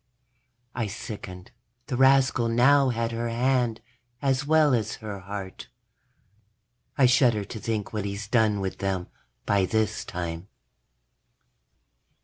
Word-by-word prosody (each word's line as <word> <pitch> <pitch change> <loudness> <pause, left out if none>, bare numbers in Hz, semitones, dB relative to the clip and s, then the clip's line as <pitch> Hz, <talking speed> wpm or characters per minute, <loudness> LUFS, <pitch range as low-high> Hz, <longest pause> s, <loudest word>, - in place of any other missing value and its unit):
_ - - -49 0.7
I 115 -3 -2
sickened. 100 -3 -8 0.3
The 125 - -3
rascal 130 -2 +4
now 135 +4 +4
had 115 -1 -1
her 115 +1 -2
hand, 120 -1 0 0.4
as 135 +1 0
well 155 -2 +4
as 110 -2 0
her 105 -3 -7
heart. 95 0 -7 1.3
I 135 - +5
shudder 120 -4 +3
to 110 - -8
think 110 -1 -3
what 105 -2 -2
he's 100 +1 -5
done 110 -3 +2
with 95 -1 -4
them, 95 -2 -2 0.4
by 100 -2 +2
this 110 0 0
time. 85 -1 -5
110 Hz, 125 wpm, -26 LUFS, 100-125 Hz, 1.3 s, I